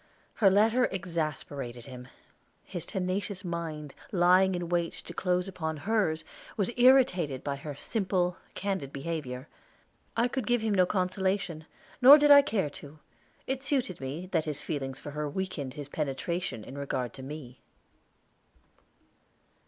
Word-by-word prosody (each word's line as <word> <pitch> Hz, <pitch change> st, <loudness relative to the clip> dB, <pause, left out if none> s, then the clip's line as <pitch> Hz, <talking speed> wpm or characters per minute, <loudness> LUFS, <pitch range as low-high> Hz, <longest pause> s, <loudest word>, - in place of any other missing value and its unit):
Her 205 Hz, -5 st, +5 dB
letter 220 Hz, +6 st, +4 dB
exasperated 150 Hz, -9 st, -4 dB
him. 125 Hz, -2 st, -9 dB, 0.6 s
His 175 Hz, -3 st, -6 dB
tenacious 190 Hz, 0 st, -3 dB
mind, 160 Hz, -4 st, -4 dB, 0.2 s
lying 185 Hz, +1 st, +4 dB
in 175 Hz, -1 st, -3 dB
wait 170 Hz, -1 st, 0 dB
to -, -, -10 dB
close 180 Hz, 0 st, 0 dB
upon 160 Hz, -4 st, -3 dB
hers, 160 Hz, -2 st, 0 dB, 0.3 s
was 205 Hz, +2 st, +1 dB
irritated 215 Hz, -, +4 dB
by 140 Hz, -1 st, -2 dB
her 145 Hz, 0 st, -7 dB
simple, 180 Hz, -, 0 dB, 0.2 s
candid 190 Hz, -8 st, -2 dB
behavior. 140 Hz, -3 st, -4 dB, 0.7 s
I 235 Hz, +2 st, +4 dB
could 250 Hz, -3 st, -3 dB
give 240 Hz, -1 st, +2 dB
him 220 Hz, -1 st, 0 dB
no 185 Hz, -2 st, +4 dB
consolation, 185 Hz, -3 st, -1 dB, 0.3 s
nor 275 Hz, +4 st, +11 dB
did 295 Hz, -1 st, +5 dB
I 285 Hz, 0 st, +11 dB
care 205 Hz, -, -1 dB
to. 145 Hz, -1 st, -12 dB, 0.5 s
It 265 Hz, 0 st, -2 dB
suited 260 Hz, -, -1 dB
me 140 Hz, +7 st, -4 dB
that 165 Hz, -3 st, +1 dB
his 150 Hz, -3 st, -3 dB
feelings 135 Hz, -3 st, -4 dB
for 145 Hz, -, -7 dB
her 150 Hz, 0 st, -3 dB
weakened 145 Hz, -6 st, -4 dB
his 145 Hz, -2 st, -6 dB
penetration 150 Hz, -2 st, -3 dB
in 140 Hz, +5 st, -8 dB
regard 130 Hz, -3 st, -2 dB
to 135 Hz, -, -10 dB
me. 130 Hz, -2 st, -8 dB
175 Hz, 145 wpm, -29 LUFS, 145-195 Hz, 0.7 s, nor